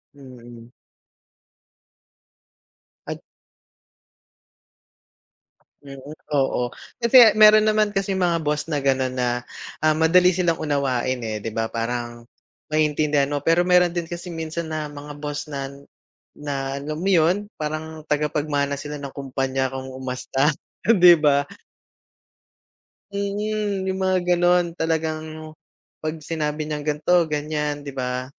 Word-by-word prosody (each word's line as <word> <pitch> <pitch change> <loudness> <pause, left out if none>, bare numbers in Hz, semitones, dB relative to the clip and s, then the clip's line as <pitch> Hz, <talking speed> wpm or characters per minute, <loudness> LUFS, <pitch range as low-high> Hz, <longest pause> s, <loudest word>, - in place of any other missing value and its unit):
Mm. 120 -3 -13 2.4
Ad - - -5 2.6
Mm, 135 -1 -10 0.4
oo. 125 -3 0 0.3
Kasi 235 -2 +7
meron 215 0 +7
naman 215 -1 +2
kasing 195 -1 -1
mga 170 -2 +2
boss 150 +1 -1
na 145 - +1
gano'n 130 -1 +1
na, 125 -1 -1 0.4
ah, 155 -1 +4
madali 180 +3 +5
silang 175 -3 0
unawain, 130 -4 0
eh, 110 -1 -3
'di 115 - -4
ba 115 +1 -1
parang 120 +1 -4 0.5
maiintindihan 150 -2 +1
mo, 145 -1 -2
pero 165 +2 +3
meron 180 -1 +4
din 170 -2 -3
kasi 175 +1 -6
minsan 160 0 -5
na 155 -1 -3
mga 145 0 -9
boss 145 0 -4
na 135 -1 -4 0.7
na 135 -2 -4
alam 150 +2 -5
mo 195 +3 -1
yun, 180 +4 +3
parang 155 +1 -5
tagapagmana 145 -1 0
sila 150 0 -6
ng 140 -1 -7
kumpanya 135 -1 -2
kong 130 0 -6
umasta, 130 +3 -1 0.4
'di 180 -6 +8
ba? 145 -2 +3 1.7
Mm, 200 0 -2
yung 190 0 -2
mga 185 0 +2 0.2
gano'n 175 -1 +2
talagang 155 -1 -3 0.5
pag 155 +1 -3
sinabi 150 -2 -2
niyang 150 -1 -4
ganito-ganyan, 150 -2 0
'di 140 - -6
ba? 125 -1 -3
150 Hz, 120 wpm, -23 LUFS, 135-175 Hz, 2.6 s, di